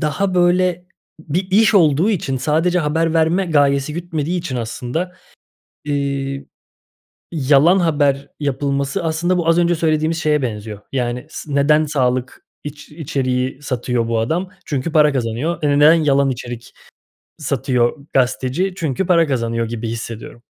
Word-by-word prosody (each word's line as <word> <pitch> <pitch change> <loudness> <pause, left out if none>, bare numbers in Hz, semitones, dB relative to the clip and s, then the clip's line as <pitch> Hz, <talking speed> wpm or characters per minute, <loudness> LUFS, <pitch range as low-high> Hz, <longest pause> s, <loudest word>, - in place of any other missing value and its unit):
daha 180 +5 -1
böyle 180 0 +2 0.3
bir 180 +5 -3
iş 215 +2 +4
olduğu 165 +2 +4
için, 135 -9 -1
sadece 160 +6 +1
haber 160 +1 0
verme 165 +4 +2
gayesi 145 -2 +2
gütmediği 170 0 -3
için 145 -7 -4
aslında, 125 +9 -4 0.7
iii, 140 -1 -2 0.9
yalan 155 +4 +4
haber 145 -4 +1
yapılması 140 +1 -1
aslında 170 +3 0
bu 165 -1 -1
az 165 +1 +4
önce 175 0 +3
söylediğimiz 160 0 0
şeye 150 -2 +1
benziyor. 105 -3 -5
Yani 125 0 -2
s 150 - -8
neden 150 +2 +3
sağlık 130 -3 -1 0.2
iç 150 0 -9
içeriği 130 -3 -2
satıyor 120 -3 -2
bu 115 -1 0
adam? 165 +11 -1 0.2
Çünkü 145 +2 -3
para 150 -2 +4
kazanıyor. 130 +7 -2
Eee, 150 - +2
neden 150 +2 +7
yalan 140 -4 +2
içerik 120 -1 -7 0.7
satıyor 135 -1 -1
gazeteci? 135 +8 0
Çünkü 170 +1 -2
para 170 -2 +4
kazanıyor 115 -4 -1
gibi 115 0 -4
hissediyorum. 115 +1 -7
145 Hz, 135 wpm, -19 LUFS, 130-165 Hz, 0.9 s, neden